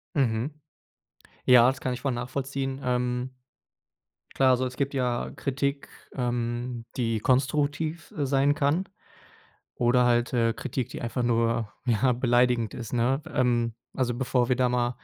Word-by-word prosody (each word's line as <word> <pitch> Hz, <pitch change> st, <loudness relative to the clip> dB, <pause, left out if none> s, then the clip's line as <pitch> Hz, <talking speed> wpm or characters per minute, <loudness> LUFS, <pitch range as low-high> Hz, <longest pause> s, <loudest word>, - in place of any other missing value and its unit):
Mhm. 125 Hz, -1 st, +1 dB, 0.9 s
Ja, 125 Hz, -1 st, +7 dB
das 130 Hz, 0 st, -3 dB
kann 130 Hz, -, -1 dB
ich 125 Hz, -, -6 dB
voll 135 Hz, -, 0 dB
nachvollziehen. 135 Hz, +2 st, -3 dB
Ähm. 125 Hz, 0 st, -1 dB, 1.0 s
Klar, 135 Hz, -1 st, +4 dB
also, 130 Hz, +1 st, +1 dB
es 125 Hz, 0 st, -5 dB
gibt 140 Hz, 0 st, -1 dB
ja 125 Hz, -2 st, -1 dB
Kritik, 140 Hz, +1 st, -2 dB, 0.3 s
ähm, 120 Hz, -1 st, -2 dB
die 115 Hz, -3 st, 0 dB
konstruktiv, 145 Hz, +5 st, 0 dB
äh, 145 Hz, -, 0 dB
sein 140 Hz, +1 st, +3 dB
kann 155 Hz, +6 st, 0 dB, 0.9 s
oder 125 Hz, +1 st, +3 dB
halt, 120 Hz, 0 st, +2 dB
äh, 115 Hz, -2 st, +2 dB
Kritik, 130 Hz, -2 st, -4 dB
die -, -, -7 dB
einfach 120 Hz, +1 st, -2 dB
nur, 115 Hz, -1 st, +1 dB
ja, 120 Hz, +3 st, +3 dB
beleidigend 120 Hz, -2 st, +2 dB
ist, 120 Hz, -1 st, -7 dB
ne? 125 Hz, +3 st, +2 dB
Ähm, 120 Hz, -4 st, +1 dB, 0.2 s
also, 125 Hz, -2 st, 0 dB
bevor 125 Hz, -1 st, 0 dB
wir 125 Hz, -, +3 dB
da 125 Hz, 0 st, +2 dB
mal 120 Hz, 0 st, +1 dB
125 Hz, 150 wpm, -27 LUFS, 120-135 Hz, 1.0 s, Ja